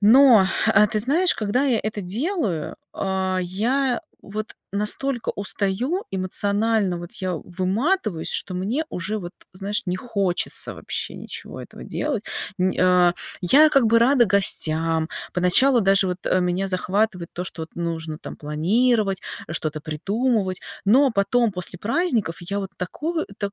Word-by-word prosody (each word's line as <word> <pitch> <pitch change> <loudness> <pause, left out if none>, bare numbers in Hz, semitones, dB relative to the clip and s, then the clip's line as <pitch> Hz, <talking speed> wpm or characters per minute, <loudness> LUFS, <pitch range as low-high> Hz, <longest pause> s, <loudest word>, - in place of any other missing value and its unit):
Но, 225 -2 +7 0.3
э, 210 +1 +6
ты 215 -2 -1
знаешь, 315 - +3
когда 220 +6 0
я 245 -5 +2
это 215 -1 -3
делаю, 210 - -2 0.2
а, 190 -1 -1
я, 240 +8 0
э, - - -5 0.2
вот 215 +2 -6 0.2
настолько 225 +5 0
устаю, 205 - 0
эмоционально 200 +1 +1
вот 175 0 -9
я, 185 -1 -4
э, 165 - -4
выматываюсь, 190 - -1
что 185 - -2
мне 220 - -2
уже 200 +5 -4
вот, 175 -1 -8 0.2
знаешь, 195 +2 -3
не 180 0 -1
хочется 200 -5 -2
вообще - - -4
ничего - - -8
этого - - -11
делать. 275 -8 -3 0.3
Не, 185 0 0
а. 180 -1 +4 0.3
Я 290 - +6
как 275 -5 +3
бы 230 +1 +4
рада 245 +1 +4
гостям, 165 -5 +3 0.3
поначалу 230 +9 +5
даже 195 -1 +3
вот, 180 0 -3
э, 185 - +2
меня 180 +2 -1
захватывает 185 -1 -1
то, 180 - -5
что 165 -2 -6
вот 160 - -10
нужно 165 -2 -4
там - - -9
планировать, 195 +7 +1 0.3
э, - - -7
что-то 155 -1 -3
придумывать, 195 - -1 0.3
но 265 +7 +5
потом 225 +2 +1
после 180 -1 -4
праздников 230 - 0
я 200 +4 -4
вот 195 -1 -5
тако 315 - -3
а, - - -2
так 200 -1 -3
200 Hz, 155 wpm, -22 LUFS, 180-235 Hz, 0.3 s, Но